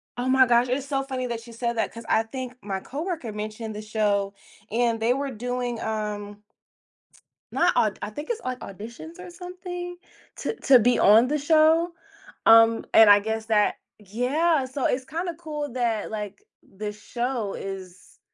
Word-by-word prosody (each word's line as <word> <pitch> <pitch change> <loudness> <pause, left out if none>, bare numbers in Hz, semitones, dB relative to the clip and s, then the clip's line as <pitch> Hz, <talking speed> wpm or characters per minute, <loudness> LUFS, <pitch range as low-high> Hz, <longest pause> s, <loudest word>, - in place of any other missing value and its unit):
Oh 250 +1 -2
my 260 -1 +5
gosh, 240 +1 +3
it's 260 +2 -1
so 270 -1 -1
funny 260 -2 -3
that 230 -1 -5
you 235 - -12
said 235 0 -2
that, - - 0
'cause 230 0 -10
I 225 - +3
think 255 +2 -6
my 195 -1 -3
co-worker 300 - -5
mentioned 215 +1 -5
the 210 - -5
show, 205 -2 0 0.4
and 230 0 +1
they 230 +2 +2
were 275 +1 -2
doing, 245 0 -3
um 210 -1 -4 1.1
not - - +3
au 215 - +3
I - - -3
think 295 - -8
it's, 465 - -2
like, 255 0 -3
auditions 235 - -9
or 365 -1 -9
something? 355 0 -7 0.4
To - - -3
to 260 -3 +7
be 245 +2 +3
on 220 +4 +6
the 300 +3 0
show? 320 +3 +4 0.5
Um, 225 0 +6
and 220 -2 +8
I 205 - +8
guess 220 +1 -3
that 210 -2 +3 0.2
yeah, 260 - +1
so 260 +1 -3
it's 255 +1 0
kinda 340 +4 -3
cool 300 -5 -5
that, 230 -4 -1
like, 210 -2 -5 0.4
the 210 0 -3
show 235 0 -3
is 185 -2 -8
240 Hz, 175 wpm, -25 LUFS, 215-275 Hz, 1.1 s, and